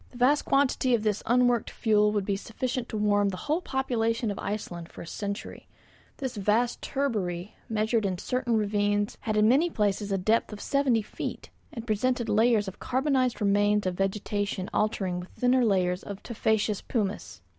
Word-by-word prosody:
The 245 Hz, -, -13 dB
vast 270 Hz, +4 st, +3 dB
quantity 265 Hz, -2 st, +2 dB
of 220 Hz, -, -2 dB
this 210 Hz, -2 st, 0 dB
unworked 245 Hz, -1 st, +3 dB
fuel 210 Hz, -2 st, +2 dB
would 205 Hz, -2 st, -1 dB
be 200 Hz, -, 0 dB
sufficient 245 Hz, +4 st, -4 dB
to 220 Hz, -, -3 dB
warm 205 Hz, -1 st, +2 dB
the 185 Hz, -, -5 dB
whole 305 Hz, -, -1 dB
population 230 Hz, -, -1 dB
of 200 Hz, -, -6 dB
Iceland 175 Hz, -5 st, -5 dB
for -, -, -9 dB
a -, -, -10 dB
century; 200 Hz, +4 st, -6 dB, 0.5 s
this 260 Hz, -5 st, -4 dB
vast 215 Hz, +4 st, +1 dB
turbary 205 Hz, -10 st, -2 dB, 0.2 s
measured 220 Hz, +1 st, +1 dB
in 185 Hz, -2 st, -2 dB
certain 240 Hz, +3 st, 0 dB
ravines 205 Hz, 0 st, 0 dB
had 215 Hz, -2 st, -1 dB
in 210 Hz, 0 st, +5 dB
many 285 Hz, +9 st, +4 dB
places 205 Hz, -, -1 dB
a 195 Hz, -, +2 dB
depth 215 Hz, +6 st, +1 dB
of 210 Hz, -, -7 dB
seventy 260 Hz, -5 st, +1 dB
feet, -, -, -6 dB, 0.2 s
and 230 Hz, -1 st, -7 dB
presented 235 Hz, +2 st, 0 dB
layers 220 Hz, 0 st, +3 dB
of 190 Hz, -, -7 dB
carbonized 260 Hz, -2 st, 0 dB
remains 205 Hz, 0 st, +3 dB
of 185 Hz, -, 0 dB
vegetation 195 Hz, 0 st, -2 dB
alternating 190 Hz, -4 st, 0 dB
with 180 Hz, -, -9 dB
thinner 250 Hz, 0 st, +2 dB
layers 185 Hz, -4 st, +1 dB
of 200 Hz, -1 st, -8 dB
tufaceous 220 Hz, -3 st, 0 dB
pumice. 205 Hz, -, -3 dB
215 Hz, 175 wpm, -27 LUFS, 205-245 Hz, 0.5 s, in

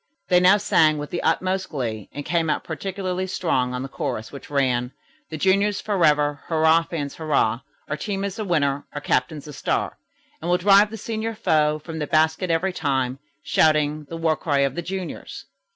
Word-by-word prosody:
They 180 Hz, -1 st, +6 dB
now 185 Hz, +3 st, +6 dB
sang 155 Hz, -6 st, +3 dB
with 145 Hz, 0 st, -6 dB
the 175 Hz, -, -2 dB
utmost 190 Hz, +1 st, 0 dB
glee, 115 Hz, -, -4 dB
and 145 Hz, -, -7 dB
came 165 Hz, -2 st, 0 dB
out 150 Hz, -, 0 dB
particularly 185 Hz, +2 st, -3 dB
strong 130 Hz, -9 st, 0 dB
on 125 Hz, -, -3 dB
the -, -, -4 dB
chorus, 110 Hz, -4 st, -4 dB
which 140 Hz, -, -10 dB
ran: 130 Hz, -3 st, 0 dB, 0.4 s
"The 155 Hz, -, -5 dB
juniors 195 Hz, +4 st, +2 dB
forever, 150 Hz, -7 st, +2 dB
hurrah, 160 Hz, 0 st, +4 dB
fans, 155 Hz, -4 st, -5 dB
hurrah! 145 Hz, -8 st, +1 dB, 0.3 s
Our 150 Hz, -, -3 dB
team 195 Hz, +3 st, -3 dB
is 200 Hz, +1 st, -4 dB
a -, -, -1 dB
winner, 145 Hz, -7 st, 0 dB
our 145 Hz, -, -5 dB
captain's 145 Hz, +2 st, -1 dB
a 150 Hz, -, -8 dB
star. -, -, -2 dB, 0.4 s
And -, -, -3 dB
we'll 180 Hz, -, +4 dB
drive 200 Hz, +3 st, +5 dB
the 225 Hz, -, -7 dB
senior 225 Hz, +1 st, -4 dB
foe, 155 Hz, -7 st, +2 dB
from 160 Hz, +1 st, -7 dB
the 150 Hz, -, -2 dB
basket 160 Hz, +4 st, +2 dB
every 175 Hz, +3 st, +1 dB
time. 135 Hz, -5 st, -1 dB, 0.2 s
Shouting 150 Hz, -1 st, +2 dB
the 165 Hz, +3 st, -7 dB
war 165 Hz, -1 st, +1 dB
cry 145 Hz, -4 st, 0 dB
of 135 Hz, -1 st, +1 dB
the 175 Hz, -, -3 dB
juniors." 185 Hz, +1 st, -6 dB
160 Hz, 190 wpm, -23 LUFS, 145-185 Hz, 0.4 s, They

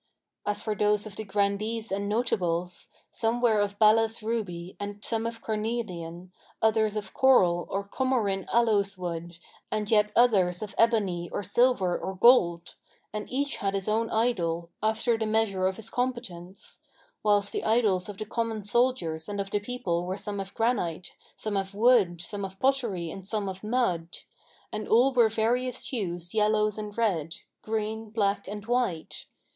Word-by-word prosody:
[FN#521] -, -, +3 dB
As 205 Hz, -, -5 dB
for 215 Hz, -, -1 dB
those 210 Hz, +1 st, +2 dB
of 210 Hz, -2 st, -8 dB
the 220 Hz, -, -5 dB
Grandees 205 Hz, +2 st, -1 dB
and 200 Hz, +1 st, -1 dB
Notables, 180 Hz, -6 st, -1 dB, 0.2 s
some 230 Hz, +1 st, 0 dB
were 230 Hz, -3 st, +3 dB
of 205 Hz, 0 st, -1 dB
balass 225 Hz, +1 st, +4 dB
ruby 190 Hz, -6 st, -3 dB
and 205 Hz, 0 st, -6 dB
some 225 Hz, 0 st, -1 dB
of 230 Hz, 0 st, -7 dB
carnelian, 185 Hz, -6 st, -4 dB, 0.3 s
others 220 Hz, -1 st, +2 dB
of 210 Hz, -1 st, -5 dB
coral 180 Hz, -10 st, +4 dB
or 200 Hz, +1 st, -2 dB
Comorin 215 Hz, -6 st, 0 dB
aloes 205 Hz, -4 st, +2 dB
wood 170 Hz, -1 st, -5 dB, 0.3 s
and 215 Hz, 0 st, -2 dB
yet 210 Hz, -1 st, +4 dB
others 195 Hz, -7 st, +3 dB
of 210 Hz, -, -7 dB
ebony 200 Hz, -7 st, +2 dB
or -, -, -3 dB
silver 205 Hz, -3 st, +2 dB
or 190 Hz, -, -4 dB
gold; 180 Hz, -6 st, +4 dB, 0.4 s
and 210 Hz, 0 st, -5 dB
each 280 Hz, +2 st, -1 dB
had 195 Hz, 0 st, -1 dB
his 195 Hz, -1 st, -2 dB
own 225 Hz, +1 st, +1 dB
idol, 170 Hz, -8 st, 0 dB
after 220 Hz, +2 st, +1 dB
the 220 Hz, -, -1 dB
measure 215 Hz, -4 st, +1 dB
of 190 Hz, -, -1 dB
his 225 Hz, +1 st, -7 dB
competence; 235 Hz, -8 st, -4 dB, 0.4 s
whilst 205 Hz, -1 st, +2 dB
the -, -, -3 dB
idols 215 Hz, -5 st, +2 dB
of 205 Hz, -, -7 dB
the 215 Hz, -, -4 dB
common 225 Hz, -1 st, -2 dB
soldiers 205 Hz, -8 st, 0 dB
and 205 Hz, 0 st, -3 dB
of 195 Hz, 0 st, -3 dB
the 205 Hz, -, +1 dB
people 190 Hz, -6 st, -2 dB
were 185 Hz, +1 st, -2 dB
some 205 Hz, 0 st, -5 dB
of 195 Hz, 0 st, -6 dB
granite, 205 Hz, -8 st, -1 dB, 0.2 s
some 215 Hz, -2 st, -4 dB
of 195 Hz, 0 st, -2 dB
wood, 210 Hz, -6 st, +4 dB
some 200 Hz, +3 st, -5 dB
of 195 Hz, 0 st, -7 dB
pottery 235 Hz, -11 st, 0 dB
and 190 Hz, +1 st, -8 dB
some 210 Hz, -2 st, -1 dB
of 190 Hz, +1 st, -6 dB
mud; 200 Hz, -8 st, -1 dB, 0.5 s
and 215 Hz, 0 st, -4 dB
all 250 Hz, +5 st, +4 dB
were 240 Hz, -3 st, +5 dB
of 220 Hz, -, -7 dB
various 245 Hz, +3 st, 0 dB
hues 175 Hz, -7 st, -3 dB
yellow 215 Hz, 0 st, +3 dB
and 210 Hz, 0 st, -6 dB
red; 175 Hz, -9 st, 0 dB, 0.3 s
green, 220 Hz, 0 st, -3 dB
black 200 Hz, -2 st, 0 dB
and 205 Hz, +1 st, -6 dB
white. 235 Hz, -9 st, -1 dB
210 Hz, 170 wpm, -28 LUFS, 190-225 Hz, 0.5 s, were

